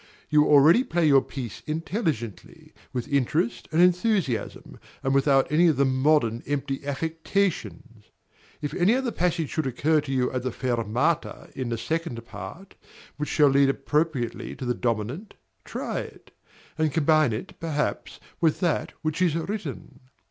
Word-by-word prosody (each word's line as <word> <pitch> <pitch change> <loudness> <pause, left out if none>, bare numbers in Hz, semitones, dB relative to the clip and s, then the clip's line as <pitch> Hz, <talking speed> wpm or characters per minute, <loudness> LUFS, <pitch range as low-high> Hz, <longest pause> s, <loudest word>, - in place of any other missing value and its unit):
You 150 0 +5
already 150 - +6
play 175 -8 0
your 140 -3 +6
piece 125 -7 -7
intelligently, 155 - -4 0.2
with 125 +1 -3
interest 125 -4 0
and 160 - +1
enthusiasm, 180 - 0 0.2
and 135 - +1
without 135 0 +3
any 170 +3 +5
of 155 -5 +2
the 140 - +4
modern, 130 -3 +2
empty 140 -1 -2
affectations. 160 - -2 0.6
If 145 - -3
any 185 +7 +3
other 260 -2 -1
passage 170 -5 -1
should 155 -3 -1
occur 150 +5 +2
to 145 -2 -6
you 130 -2 +1
at 130 - -2
the 130 +1 -2
fermata 125 +6 -1
in 130 -2 -3
the 115 - -2
second 120 -1 -3
part, 115 - -9 0.4
which 150 0 -3
shall 145 -2 +4
lead 135 0 +4
appropriately 140 -2 -1
to 130 - -6
the 125 - +1
dominant, 120 - -3 0.3
try - - -3
it; - - -10 0.5
and 155 -1 +2
combine 155 -2 +3
it, 110 - -6
perhaps, 150 -3 -3 0.2
with 160 -3 +2
that 175 -4 0
which 155 +3 -2
is 170 -4 +3
written. 165 -7 -5
145 Hz, 150 wpm, -25 LUFS, 130-165 Hz, 0.6 s, already